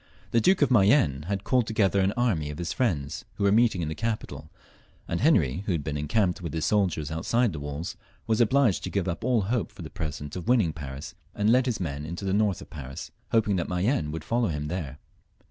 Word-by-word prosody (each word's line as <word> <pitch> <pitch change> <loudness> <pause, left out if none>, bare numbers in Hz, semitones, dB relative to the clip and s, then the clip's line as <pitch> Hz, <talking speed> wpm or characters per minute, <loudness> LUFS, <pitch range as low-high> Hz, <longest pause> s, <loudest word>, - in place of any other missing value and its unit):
The 115 - +3
Duke 185 - +4
of 140 - +1
Mayenne 95 - +4
had 100 0 -2
called 125 -3 +2
together 100 -3 +2
an 95 +1 +3
army 100 -12 0
of 75 - -6
his 85 -1 -3
friends, 80 - -1
who - - -3
were 100 - +4
meeting 110 -5 +3
in - - -2
the 80 - -2
capital, 80 -7 -4 0.6
and 85 - -2
Henry, 90 - +3
who 95 - +1
had 80 -4 -1
been 75 0 -3
encamped 90 +5 0
with 85 -4 -5
his 80 0 -1
soldiers 85 -6 +1
outside 110 +7 +1
the 75 - -5
walls, 75 +4 -5 0.3
was 110 +1 +2
obliged 120 -5 +3
to - - -3
give 95 -2 -1
up 85 - -3
all 125 -3 +2
hopes 110 +4 -2
for - - -8
the - - -8
present 75 -2 -5
of 90 - -6
winning 110 -10 +3
Paris, 70 -2 -7 0.2
and 105 +2 +2
led 130 +2 +4
his 120 -4 -1
men 75 -5 -3
into 85 +5 -5
the 95 - 0
north 100 -3 +1
of - - -16
France, 70 -4 -8 0.2
hoping 105 -4 +2
that 85 - -2
Mayenne 90 - 0
would 80 +1 -5
follow 120 +4 +1
him 75 -3 -3
there. 75 -5 -4
95 Hz, 230 wpm, -27 LUFS, 75-110 Hz, 0.6 s, Duke